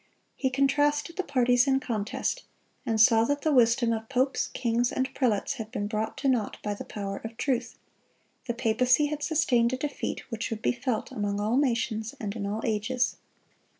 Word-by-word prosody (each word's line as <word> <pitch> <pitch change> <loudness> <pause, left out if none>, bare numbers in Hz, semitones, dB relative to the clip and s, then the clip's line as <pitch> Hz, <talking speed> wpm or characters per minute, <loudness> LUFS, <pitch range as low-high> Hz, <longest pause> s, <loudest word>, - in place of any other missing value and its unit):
He 265 - 0
contrasted 290 +4 +1
the 375 - -1
parties 250 -3 +3
in 270 0 +3
contest, 225 - -2 0.5
and 225 -1 +1
saw 225 0 +6
that 285 +3 0
the 310 - +2
wisdom 235 -1 +4
of 220 0 -5
popes, 265 +1 +1
kings, 240 0 0
and 260 0 -2
prelates 245 0 +1
had 220 -2 -6
been 205 -5 -2
brought 215 +1 -3
to 275 - -1
naught 245 -6 +1
by 210 - -1
the 205 - -7
power 195 -1 -5
of 225 0 -7
truth. 250 -3 -1 0.7
The 235 - -1
papacy 245 +5 +3
had 295 0 -3
sustained 255 -6 +2
a - - 0
defeat 285 +1 -3
which 225 -1 -3
would 225 -1 -5
be - - +3
felt 245 -2 -3
among 205 -4 -2
all 215 +3 0
nations 230 -5 0
and 205 -1 -4
in 200 -3 -3
all 210 +2 -3
ages. 235 +3 0
240 Hz, 185 wpm, -27 LUFS, 220-265 Hz, 0.7 s, saw